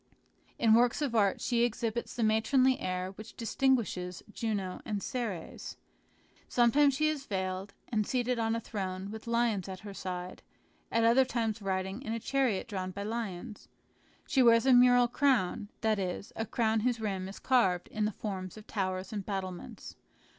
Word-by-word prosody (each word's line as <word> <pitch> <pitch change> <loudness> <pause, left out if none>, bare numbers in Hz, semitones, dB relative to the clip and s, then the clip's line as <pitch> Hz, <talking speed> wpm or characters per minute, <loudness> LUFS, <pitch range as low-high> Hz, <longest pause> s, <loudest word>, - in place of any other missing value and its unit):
In 225 -2 +4
works 235 +1 +4
of 270 -5 -1
art 205 -4 +2
she 240 -2 +1
exhibits 235 0 -1
the 235 - 0
matronly 255 +4 +3
air 185 0 -2
which 215 +3 -12
distinguishes 225 -7 0
Juno 200 -5 -2
and 205 -4 -3
Ceres. 230 -9 -4 0.7
Sometimes 270 +4 +4
she 310 +2 +2
is 295 -3 -2
veiled, 190 0 -3
and 215 -3 0
seated 250 -1 0
on 225 0 +1
a - - -1
throne 195 -3 -4
with 220 +2 -8
lions 230 -5 +1
at 185 -1 -7
her 205 -1 -8
side, 180 -1 -5 0.5
at 230 - +2
other 235 +3 +6
times 230 -3 -2
riding 190 +3 -2
in 225 -5 -4
a 230 - -2
chariot 255 -5 0
drawn 190 -4 -3
by 200 +2 -5
lions. 215 -1 -5 0.6
She 265 - +2
wears 230 -1 +6
a 265 - +6
mural 245 0 +6
crown, 235 -6 +1
that 220 -2 +2
is, 185 +1 -4
a 225 - -3
crown 225 -2 +1
whose 235 +1 0
rim 195 -4 -2
is 195 - -9
carved 190 -9 +2
in 215 -1 -1
the 210 - 0
form 190 -3 -5
of 215 - -11
towers 185 -1 -3
and 205 -2 -3
battlements. 190 -3 -6
220 Hz, 170 wpm, -31 LUFS, 190-240 Hz, 0.7 s, other